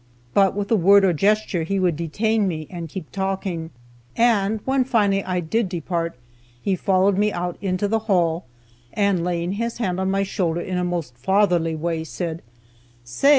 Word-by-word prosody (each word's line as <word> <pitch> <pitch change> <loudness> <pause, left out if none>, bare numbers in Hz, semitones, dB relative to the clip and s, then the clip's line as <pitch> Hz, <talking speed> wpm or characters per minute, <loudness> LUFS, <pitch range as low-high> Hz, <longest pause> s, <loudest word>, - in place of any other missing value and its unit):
But 195 -2 +4
with 205 +1 -3
a - - +6
word 200 +1 +6
or 180 - +3
gesture 205 +1 +1
he 195 +5 -1
would 180 -3 +2
detain 205 +7 0
me, 155 -4 -3
and 170 -3 -6
keep 160 0 -7
talking. 190 -4 -3 0.5
And 220 -3 +3
when 265 0 +2
I - - +1
finally 195 -7 +1
did 190 +5 0
depart, 170 -3 -3 0.4
he 195 +8 0
followed 190 +1 +2
me 210 0 +2
out 175 -1 -3
into 190 0 0
the 225 +2 +1
hall, 170 -3 +2 0.5
and 200 -4 +1
laying 175 0 -1
his 230 +4 -3
hand 190 -6 -1
on 190 0 0
my 195 +1 +1
shoulder 175 -4 -1
in 180 0 -2
a - - 0
most 170 -8 -3
fatherly 175 -1 +2
way, 165 0 -2
said, 165 0 -4 0.6
"Say! 125 - +1
185 Hz, 180 wpm, -22 LUFS, 170-200 Hz, 0.6 s, a